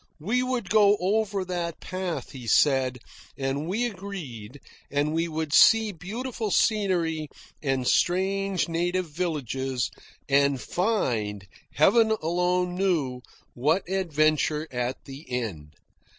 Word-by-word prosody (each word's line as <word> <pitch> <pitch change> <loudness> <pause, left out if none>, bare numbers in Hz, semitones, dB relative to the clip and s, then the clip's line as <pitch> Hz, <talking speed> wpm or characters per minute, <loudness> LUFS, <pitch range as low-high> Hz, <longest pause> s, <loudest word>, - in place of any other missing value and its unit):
We 220 +11 0
would 250 -7 -2
go 210 -1 +5
over 200 0 0
that 175 -2 -3
path, 185 -2 -4
he 125 -4 -9
said, 130 +1 +3 0.4
and 135 +3 -2
we 215 +7 0
agreed, 160 - -7 0.3
and 145 +2 0
we 165 +1 0
would 160 -2 -3
see 225 +3 +6
beautiful 220 +6 -5
scenery, 175 -8 +1 0.3
and 135 -3 -1
strange 190 +1 +1
native 175 0 -1
villages, 135 -6 -2 0.4
and 140 -1 +3
find, 120 - -1 0.3
Heaven 220 +1 +5
alone 180 +2 0
knew, 165 -10 0 0.3
what 155 +10 +1
adventure 155 -4 +1
at 125 +1 -3
the 140 +2 -9
end. 95 -12 -4
165 Hz, 115 wpm, -26 LUFS, 135-195 Hz, 0.4 s, see